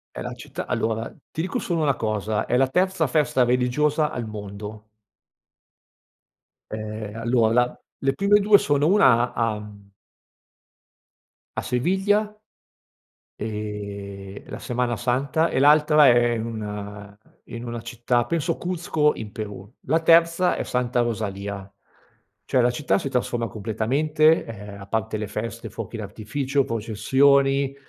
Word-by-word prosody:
È - - -5
la - - -5
città - - -7
allora, 110 0 -1 0.2
ti 160 - -3
dico 185 - -2
solo 170 -3 -1
una 140 -2 +2
cosa, 110 -2 -2
è 125 - +1
la 135 - +4
terza 180 +1 +1
festa 135 -2 +2
religiosa 140 +5 +1
al 120 -3 -4
mondo. 105 0 -8 1.9
Ehm, 110 -1 -6
allora 115 -1 +2
la 125 +1 +1 0.2
le 135 0 +1
prime 200 +7 +4
due 205 0 +6
sono 145 -3 +1
una 130 - +4
a 115 -2 0
mhmm 100 -1 -12 1.7
a - - -1
Sevilla, 200 - 0 1.0
ehm, 100 -2 -6
la - - -6
Semana 125 -1 -1
Santa, 135 +8 +1
e - - -1
l'altra 150 +1 +6
è 120 0 +5
in 110 - -3
una 105 -2 -7 0.3
in 115 +1 -8
una 120 -1 -5
città 120 +1 -1
penso 165 -1 -1
Cuzco 165 -4 0
in 105 -2 -7
Perù. 105 -4 -7 0.2
La 160 +5 +3
terza 165 +2 +4
è - - -2
Santa 125 0 0
Rosalia. 100 -4 -3 0.8
Cioè 130 - +2
la 120 0 +4
città 120 -5 0
si - - -3
trasforma 120 -3 -1
completamente, 140 +9 +1
ehm, 105 -2 -9
a 100 - -10
parte 110 +1 -2
le 105 0 -3
feste, 110 +2 -5
fuochi 115 0 -6
d'artificio, 120 +7 -2
processioni, 135 +5 +2
120 Hz, 135 wpm, -24 LUFS, 105-145 Hz, 1.9 s, due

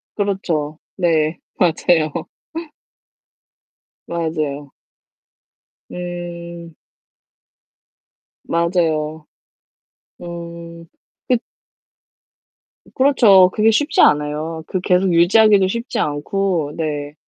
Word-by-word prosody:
그렇죠. 170 -7 -2 0.2
네. 160 -3 +1 0.2
맞아요. 160 -2 +2 2.0
맞아요. 155 -4 -3 1.2
음. 170 -2 -7 1.7
맞아요. 160 -3 -1 1.0
음. 170 -1 -9 0.4
그 250 -2 +3 1.6
그렇죠. 220 -9 +6
그게 220 +1 +3
쉽지 290 +7 +2
않아요. 150 +2 +1
그 185 - -2
계속 180 0 +2
유지하기도 195 +3 +5
쉽지 235 +5 -3
않고. 155 +1 -1
네. 145 -2 -3
170 Hz, 135 characters per minute, -19 LUFS, 155-185 Hz, 2.0 s, 그렇죠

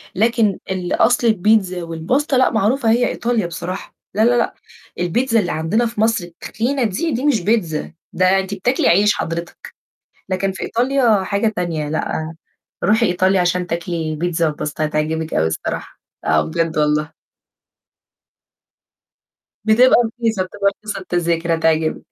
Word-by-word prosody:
لكن 225 -1 +2
الأصل 225 +6 +1
البيتزا 200 -3 +2
والpasta 170 - -1
لأ، 260 - +4
معروفة 225 +3 +1
هي 245 +2 +3
إيطاليا 230 -6 -1
بصراحة، 175 +3 -6 0.2
لأ، 215 - 0
لأ، 240 0 +3
لأ، - - 0 0.5
البيتزا 225 +7 +1
اللي 180 - -1
عندنا 180 +10 0
في 225 -2 -3
مصر 225 -4 +2
التخينة 235 +10 -3
دي، 235 - -1
دي 255 +4 -2
مش 245 -10 +2
بيتزا 175 -6 -1 0.2
ده 185 +1 +3
أنتِ 190 +1 -4
بتاكلي 240 +7 0
عيش 205 +4 +4
حضرتك، 170 +1 -5 0.6
لكن 195 +1 0
في 190 - -6
إيطاليا 240 -4 +2
حاجة 200 +3 0
تانية 160 -4 -2
لأ، 160 0 -3 0.5
روحي 220 +3 +3
إيطاليا 185 +1 +2
عشان 180 0 0
تاكلي 165 -2 -3
بيتزا 165 0 0
والpasta 150 +1 -5
هتعجبِك 155 +1 -1
أوي 80 - +2
الصراحة. 80 - -4 0.3
آه، 80 0 +3
بجد 160 - -2
والله. 150 +1 +1 2.5
بتبقى 235 +4 +5 0.2
رخيصة، 225 -4 +1
بتبقى 200 +2 0
رخيصة 215 -2 -5
التذاكر 170 -2 0
هتعجبِك، 160 -1 +1
185 Hz, 140 wpm, -19 LUFS, 165-225 Hz, 2.5 s, بتبقى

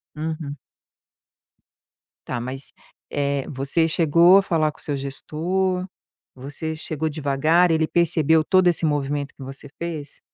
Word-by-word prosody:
Uhum. 155 -2 -4 1.7
Tá, 125 - -2
mas, 130 +3 -6 0.4
eh, 140 -1 -1
você 140 +4 0
chegou 170 +3 +5
a - - +2
falar 155 -4 +1
com - - -20
o - - -10
seu 145 -2 -2
gestor? 180 +7 -2 0.5
Você 145 +5 -6
chegou 155 0 -3
devagar, 155 +3 +2
ele 160 -1 +2
percebeu 160 -2 +3
todo 185 +2 +3
esse 175 -1 +2
movimento 145 -1 -1
que 135 - -10
você 135 +2 -9
fez? 160 -4 -6
155 Hz, 135 wpm, -23 LUFS, 140-170 Hz, 1.7 s, chegou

